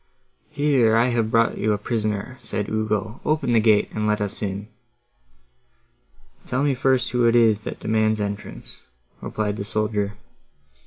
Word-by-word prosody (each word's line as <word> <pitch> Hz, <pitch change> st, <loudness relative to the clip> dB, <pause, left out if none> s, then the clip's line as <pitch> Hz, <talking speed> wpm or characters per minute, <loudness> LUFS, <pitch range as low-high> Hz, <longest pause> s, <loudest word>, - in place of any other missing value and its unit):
"Here, 135 Hz, -6 st, +3 dB
I 120 Hz, +2 st, +3 dB
have 115 Hz, -2 st, 0 dB
brought 115 Hz, 0 st, +2 dB
you 110 Hz, 0 st, +2 dB
a -, -, 0 dB
prisoner," 110 Hz, +2 st, -2 dB
said 115 Hz, -3 st, -4 dB
Ugo, 110 Hz, 0 st, -2 dB
"open 150 Hz, -5 st, 0 dB
the 115 Hz, -, +5 dB
gate, 110 Hz, -2 st, +3 dB
and 105 Hz, 0 st, -1 dB
let 105 Hz, 0 st, +1 dB
us 105 Hz, -1 st, -4 dB
in." 100 Hz, 0 st, -4 dB, 1.8 s
"Tell 130 Hz, +2 st, 0 dB
me 145 Hz, -1 st, +2 dB
first 130 Hz, -1 st, +1 dB
who 125 Hz, -1 st, +3 dB
it 115 Hz, -, +3 dB
is, 110 Hz, -3 st, +3 dB
that -, -, -5 dB
demands 110 Hz, 0 st, +1 dB
entrance," 100 Hz, 0 st, -6 dB, 0.4 s
replied 105 Hz, -1 st, -2 dB
the 100 Hz, -, -3 dB
soldier. 105 Hz, -1 st, -1 dB
110 Hz, 155 wpm, -23 LUFS, 105-120 Hz, 1.8 s, the